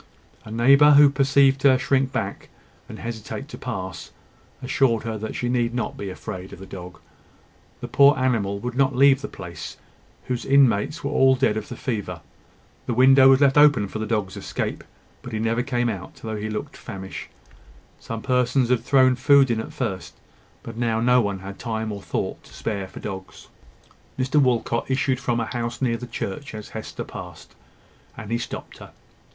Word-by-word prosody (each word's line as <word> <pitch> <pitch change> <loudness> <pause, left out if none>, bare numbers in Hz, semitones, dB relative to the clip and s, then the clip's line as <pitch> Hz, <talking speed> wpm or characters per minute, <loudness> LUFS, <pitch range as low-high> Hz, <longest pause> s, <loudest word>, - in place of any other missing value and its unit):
A - - -10
neighbour 140 +6 +6
who 145 0 +7
perceived 135 0 +3
her 130 -2 +5
shrink 130 0 +1
back, - - -4 0.4
and - - -8
hesitate 115 +4 -6
to - - -8
pass, 95 -8 -6 0.5
assured 130 -3 +1
her 115 -1 -3
that 110 +1 -5
she 120 - -2
need 120 -1 0
not 120 - -2
be 100 - -6
afraid 95 0 -7
of - - -10
the 95 - -10
dog. 90 -3 -9 0.8
The - - -5
poor 140 0 +5
animal 115 -7 0
would 125 0 -4
not 135 0 +1
leave 135 +1 +5
the 140 - -4
place, 85 -2 -9 0.5
whose 125 -1 -3
inmates 135 -1 +3
were 140 - -2
all 135 -2 +4
dead 105 - +1
of 110 -1 -5
the - - -6
fever. 100 - -4 0.7
The 120 - -1
window 135 +1 +7
was 135 +1 +5
left 140 0 +5
open 145 -9 +5
for 110 - -6
the 110 - -3
dog's 105 -4 -2
escape; - - -4 0.4
but 125 - -9
he 110 - -2
never 115 +2 0
came 120 -2 -1
out, 100 -6 -5
though 110 -1 -6
he 105 +1 -4
looked 105 - -5
famished. 95 0 -8 0.7
Some 115 -1 -6
persons 125 -1 +1
had 125 -2 +2
thrown 130 -2 +5
in 125 - +1
food 140 -1 +5
at 110 -1 -2
first; 95 -2 -4 0.5
but 115 -1 -9
now 115 -2 0
no 125 +2 +4
one 100 -3 -3
had 100 +1 -9
time 110 -2 -3
or 100 -1 -6
thought - - -4
to - - -17
spare 100 -3 -3
for - - -11
dogs. 95 -2 -8 0.7
Mr 135 +3 +2
Walcot 120 -2 0
issued 130 -1 +1
from 120 -3 -1
a 115 - -1
house 120 0 -4
near 120 -3 0
the 125 +1 -8
church 115 +4 -5
as 105 -1 -8
Hester 110 - -6
passed, - - -10 0.6
and 115 -1 -8
he 115 - 0
stopped - - -7
her. - - -12
120 Hz, 190 wpm, -23 LUFS, 110-135 Hz, 0.8 s, who